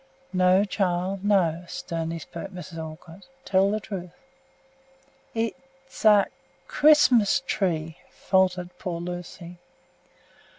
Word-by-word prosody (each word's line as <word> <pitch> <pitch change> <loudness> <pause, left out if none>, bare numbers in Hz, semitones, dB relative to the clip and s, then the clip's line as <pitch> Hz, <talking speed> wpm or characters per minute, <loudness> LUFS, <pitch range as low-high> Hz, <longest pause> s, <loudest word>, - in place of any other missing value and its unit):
"No, 185 +1 +4
child, 190 -1 -1
no!" 180 -5 +2
sternly 165 0 -4
spoke 170 +3 -8
Mrs. 180 -3 -9
Olcott. 160 +3 -10 0.2
"Tell 195 0 +3
the 215 +1 0
truth!" 190 -4 -7 1.3
"It's 265 +4 -6
a 210 -2 +7 0.4
Christmas 275 -7 +5
tree!" 165 -7 -1
faltered 185 -2 0
poor 170 -2 -4
Lucy. 175 0 -7
185 Hz, 95 wpm, -25 LUFS, 170-205 Hz, 1.3 s, a